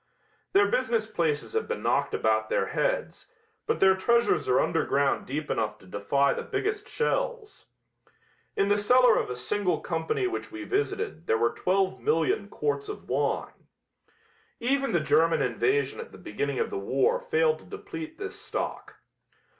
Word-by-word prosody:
Their 200 Hz, +1 st, +6 dB
business 230 Hz, -1 st, +1 dB
places 165 Hz, -, -1 dB
have 450 Hz, 0 st, -1 dB
been 475 Hz, -, -4 dB
knocked -, -, +1 dB
about -, -, +1 dB
their -, -, +1 dB
heads, -, -, -2 dB, 0.4 s
but 450 Hz, -, 0 dB
their 190 Hz, 0 st, +6 dB
treasures 235 Hz, +5 st, +2 dB
are 125 Hz, -, +4 dB
underground 140 Hz, -4 st, +1 dB
deep 150 Hz, +3 st, -3 dB
enough 105 Hz, -1 st, -1 dB
to 95 Hz, -, -19 dB
defy 100 Hz, +9 st, +1 dB
the -, -, -4 dB
biggest 415 Hz, +1 st, -2 dB
shells. 475 Hz, -2 st, -2 dB, 0.9 s
In 195 Hz, -, +2 dB
the 205 Hz, 0 st, +3 dB
cellar 245 Hz, +2 st, +5 dB
of -, -, -3 dB
a 125 Hz, -, -3 dB
single 180 Hz, +10 st, -1 dB
company 165 Hz, -, -1 dB
which 370 Hz, -, -3 dB
we 335 Hz, -1 st, -6 dB
visited 400 Hz, -, -2 dB
there 110 Hz, -, +3 dB
were 115 Hz, +1 st, +1 dB
12,000,000 195 Hz, -, +1 dB
quarts 425 Hz, -1 st, -2 dB
of 420 Hz, -, -7 dB
wine. -, -, -2 dB, 0.9 s
Even 275 Hz, +3 st, +1 dB
the 170 Hz, -, +2 dB
German 165 Hz, +2 st, +3 dB
invasion 430 Hz, +3 st, 0 dB
at 470 Hz, 0 st, -8 dB
the -, -, -12 dB
beginning -, -, -3 dB
of 460 Hz, -, -1 dB
the 400 Hz, -, -3 dB
war 475 Hz, +4 st, +1 dB
failed 475 Hz, -1 st, +1 dB
to -, -, -17 dB
deplete 350 Hz, -6 st, -8 dB
this 395 Hz, -1 st, -6 dB
stock. -, -, -4 dB
255 Hz, 160 wpm, -27 LUFS, -, 0.9 s, Their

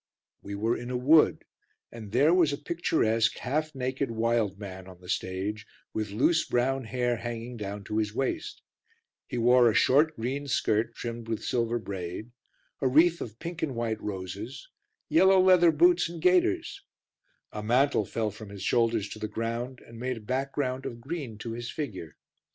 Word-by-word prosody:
We 100 Hz, -, -6 dB
were 110 Hz, +4 st, 0 dB
in 120 Hz, +1 st, -6 dB
a 125 Hz, -, -1 dB
wood 150 Hz, +5 st, +4 dB, 0.5 s
and 110 Hz, -4 st, -9 dB
there 140 Hz, +8 st, +4 dB
was 170 Hz, -5 st, +4 dB
a 140 Hz, -, -2 dB
picturesque, 120 Hz, -8 st, +1 dB
half 155 Hz, +3 st, -2 dB
naked, 130 Hz, +1 st, -2 dB
wild 115 Hz, -3 st, 0 dB
man 95 Hz, -2 st, -8 dB
on 90 Hz, -2 st, -13 dB
the 90 Hz, -, -15 dB
stage 95 Hz, +3 st, -3 dB, 0.3 s
with 110 Hz, -1 st, -2 dB
loose, 145 Hz, +11 st, +2 dB
brown 130 Hz, +1 st, 0 dB
hair 120 Hz, 0 st, 0 dB
hanging 120 Hz, +2 st, -5 dB
down 100 Hz, -2 st, -5 dB
to 105 Hz, +2 st, -4 dB
his 105 Hz, -1 st, -1 dB
waist; 325 Hz, -, -3 dB, 0.6 s
he -, -, -4 dB
wore 120 Hz, +1 st, +5 dB
a 110 Hz, -, 0 dB
short, 150 Hz, +8 st, +4 dB
green 135 Hz, +4 st, -3 dB
skirt 110 Hz, -3 st, +1 dB
trimmed 115 Hz, -1 st, -6 dB
with 115 Hz, -1 st, -3 dB
silver 120 Hz, -1 st, 0 dB
braid, 100 Hz, +1 st, -6 dB, 0.5 s
a 135 Hz, -, +3 dB
wreath 165 Hz, +6 st, +4 dB
of 110 Hz, -2 st, -6 dB
pink 170 Hz, +3 st, -6 dB
and 140 Hz, -6 st, -2 dB
white 115 Hz, -2 st, -2 dB
roses, 100 Hz, -, -6 dB, 0.4 s
yellow 190 Hz, -10 st, +5 dB
leather 180 Hz, -2 st, +6 dB
boots 350 Hz, -, +4 dB
and 170 Hz, -1 st, -7 dB
gaiters; 335 Hz, -, +2 dB, 0.7 s
a 105 Hz, -, -5 dB
mantle 125 Hz, +2 st, +3 dB
fell 110 Hz, +2 st, -2 dB
from 105 Hz, +1 st, -10 dB
his 100 Hz, -2 st, -8 dB
shoulders 115 Hz, -2 st, +2 dB
to 110 Hz, -, -8 dB
the 110 Hz, -, -3 dB
ground 115 Hz, +4 st, -4 dB
and 115 Hz, 0 st, -13 dB
made 125 Hz, 0 st, -2 dB
a -, -, -9 dB
background 130 Hz, +2 st, -2 dB
of 120 Hz, -, -7 dB
green 135 Hz, -4 st, -5 dB
to 115 Hz, +2 st, -6 dB
his 120 Hz, +1 st, -5 dB
figure. 95 Hz, -, -6 dB
120 Hz, 175 wpm, -28 LUFS, 110-140 Hz, 0.7 s, leather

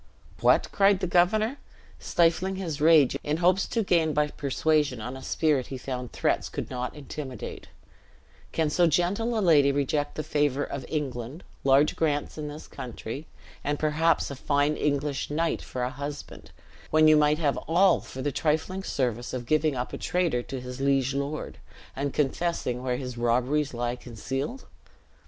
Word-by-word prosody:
"What?" -, -, +3 dB
cried 195 Hz, -1 st, +4 dB
the 190 Hz, -, -1 dB
governor, 215 Hz, +9 st, +2 dB, 0.4 s
stifling 175 Hz, +3 st, +2 dB
his 165 Hz, -6 st, -4 dB
rage, 155 Hz, -4 st, +6 dB
in 150 Hz, +1 st, 0 dB
hopes 180 Hz, +3 st, +3 dB
to 230 Hz, -, 0 dB
gain 165 Hz, -5 st, +2 dB
by 150 Hz, 0 st, +2 dB
persuasion 145 Hz, -2 st, 0 dB
on 125 Hz, +4 st, -5 dB
a 130 Hz, -, -8 dB
spirit 145 Hz, -3 st, +1 dB
he 135 Hz, -, -5 dB
found 125 Hz, -1 st, -5 dB
threats -, -, 0 dB
could -, -, -5 dB
not 125 Hz, 0 st, -4 dB
intimidate; 140 Hz, -4 st, -7 dB, 0.8 s
"can 160 Hz, -2 st, 0 dB
so 175 Hz, +2 st, +4 dB
gentle 200 Hz, +8 st, +1 dB
a -, -, +2 dB
lady 150 Hz, -6 st, +5 dB
reject 145 Hz, +1 st, -1 dB
the 155 Hz, -, -3 dB
favor 145 Hz, -2 st, +1 dB
of 140 Hz, -, -5 dB
England, 135 Hz, 0 st, -4 dB, 0.2 s
large 140 Hz, +2 st, +4 dB
grants 145 Hz, -3 st, -1 dB
in 150 Hz, -1 st, -5 dB
this 150 Hz, +1 st, -8 dB
country, 125 Hz, +4 st, -7 dB, 0.4 s
and 145 Hz, +1 st, -1 dB
perhaps 155 Hz, +1 st, +1 dB
a -, -, -5 dB
fine 145 Hz, +3 st, +1 dB
English 145 Hz, -1 st, -1 dB
knight 165 Hz, +2 st, 0 dB
for 125 Hz, -, -5 dB
a 125 Hz, -, -1 dB
husband, 145 Hz, +2 st, -7 dB, 0.4 s
when 155 Hz, 0 st, +5 dB
you 155 Hz, -, +7 dB
might 150 Hz, 0 st, +4 dB
have 150 Hz, -4 st, 0 dB
all 180 Hz, +4 st, +4 dB
for 130 Hz, -, -8 dB
the 145 Hz, -, 0 dB
trifling 160 Hz, +7 st, 0 dB
service 125 Hz, -, -2 dB
of 125 Hz, -1 st, -5 dB
giving 155 Hz, +2 st, +2 dB
up 125 Hz, 0 st, -4 dB
a -, -, -5 dB
traitor 175 Hz, -9 st, 0 dB
to 135 Hz, +2 st, -6 dB
his 125 Hz, +1 st, -7 dB
liege 135 Hz, -1 st, +2 dB
lord, 140 Hz, +2 st, -4 dB, 0.4 s
and 140 Hz, +1 st, -2 dB
confessing 145 Hz, -3 st, -1 dB
where 125 Hz, -1 st, -1 dB
his 125 Hz, -2 st, -6 dB
robberies 125 Hz, +5 st, +1 dB
lie 120 Hz, 0 st, -2 dB
concealed? 135 Hz, -, -5 dB
145 Hz, 170 wpm, -27 LUFS, 130-160 Hz, 0.8 s, you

